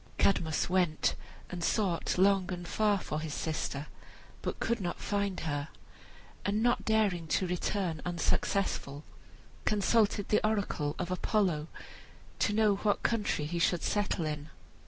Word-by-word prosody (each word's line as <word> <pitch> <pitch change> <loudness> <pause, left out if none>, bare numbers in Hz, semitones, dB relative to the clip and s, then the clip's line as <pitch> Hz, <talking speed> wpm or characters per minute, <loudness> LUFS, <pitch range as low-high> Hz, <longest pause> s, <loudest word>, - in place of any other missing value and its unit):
Cadmus 165 -5 +2
went 180 -4 +2 0.4
and 175 -2 -4
sought 185 -4 +1
long 190 0 +4
and 175 -1 -5
far 210 +2 +2
for 155 -5 -3
his 155 -2 -4
sister, 150 -2 -2 0.6
but - - -3
could 235 -1 0
not 175 -2 -3
find 200 -2 -1
her, 145 -2 -2 0.8
and 210 +2 +1
not 240 0 +2
daring 205 -7 +2
to 185 - +1
return 180 -2 -1
unsuccessful, 170 -4 -1 0.6
consulted 210 0 +2
the 210 - +3
oracle 200 -9 0
of 180 - -3
Apollo 180 -5 +1 0.7
to - - +2
know 210 -1 +3
what 205 0 0
country 210 -9 0
he 170 +3 -2
should 170 0 +2
settle 205 -5 0
in. 150 0 -4
185 Hz, 135 wpm, -31 LUFS, 160-205 Hz, 0.8 s, long